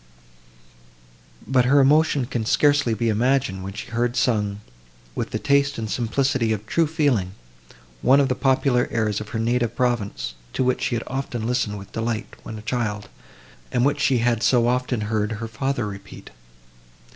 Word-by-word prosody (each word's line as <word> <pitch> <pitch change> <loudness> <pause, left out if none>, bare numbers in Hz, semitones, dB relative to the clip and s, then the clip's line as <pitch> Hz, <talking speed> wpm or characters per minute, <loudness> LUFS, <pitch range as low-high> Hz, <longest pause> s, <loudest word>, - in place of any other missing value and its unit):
]) - - -27
But 130 -2 +3
her 140 +3 +5
emotion 145 -1 +4
can 120 -3 -3
scarcely 145 0 +3
be 115 +2 -1
imagined, 120 -2 +1
when 95 +1 -6
she 110 - -8
heard 120 +1 0
sung, 105 -5 0 0.5
with - - -3
the - - -2
taste 140 0 +2
and 110 -2 -4
simplicity 120 +2 0
of 105 -1 -2
true 165 +7 +1
feeling, 140 - 0 0.7
one 135 +2 +5
of 140 - +3
the 130 - +1
popular 130 -1 +2
airs 110 -3 -1
of 105 - -8
her - - -4
native 120 +1 0
province, 120 - -1 0.2
to - - 0
which 130 0 0
she 120 - 0
had 115 - -2
so - - -9
often 125 -4 -3
listened 120 -4 -1
with 100 0 -11
delight, 115 -1 -3
when 110 - -8
a 105 - -10
child, 105 -3 -2 0.6
and 125 +1 +2
which 140 - +1
she 130 - +3
had 115 -1 +1
so 120 -1 +3
often 125 -1 0
heard 105 0 -1
her 115 +1 -5
father 120 +2 -2
repeat! 100 -1 -9
120 Hz, 180 wpm, -23 LUFS, 105-130 Hz, 0.7 s, her